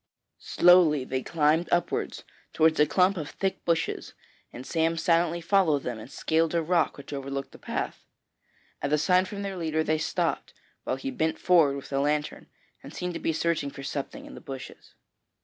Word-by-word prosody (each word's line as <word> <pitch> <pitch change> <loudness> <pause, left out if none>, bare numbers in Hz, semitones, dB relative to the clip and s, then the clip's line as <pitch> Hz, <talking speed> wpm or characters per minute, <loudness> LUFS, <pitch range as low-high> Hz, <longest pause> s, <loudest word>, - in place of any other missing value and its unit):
Slowly 175 -6 +5
they 130 0 -3
climbed 160 +3 +1
upwards 175 0 -1 0.3
towards 160 0 +3
a 150 - +5
clump 185 +5 +3
of 150 -3 -4
thick 195 -1 -3
bushes, 165 -1 -1 0.4
and 125 - -9
Sam 165 0 0
silently 170 +1 +2
followed 165 -5 +2
them 120 -3 -4
and 110 - -10
scaled 160 +3 0
a 165 - +2
rock 175 +2 +1
which 140 0 -9
overlooked 140 0 -5
the - - -14
path. - - -4 0.8
At 140 - -2
a - - +5
sign 180 +4 +3
from 200 +1 -6
their 195 -1 -4
leader 160 -2 0
they 155 0 0
stopped, 155 - -2 0.3
while - - 0
he 270 - -5
bent 160 -11 -1
forward 165 -6 +4
with 140 - -8
the 135 - -1
lantern, 150 +1 -1 0.3
and - - -11
seemed 180 0 -4
to 165 - -4
be - - 0
searching 160 -2 0
for 140 - -10
something 145 - -5
in 290 - -11
the - - -10
bushes. 135 -2 -10
160 Hz, 185 wpm, -27 LUFS, 145-175 Hz, 0.8 s, Slowly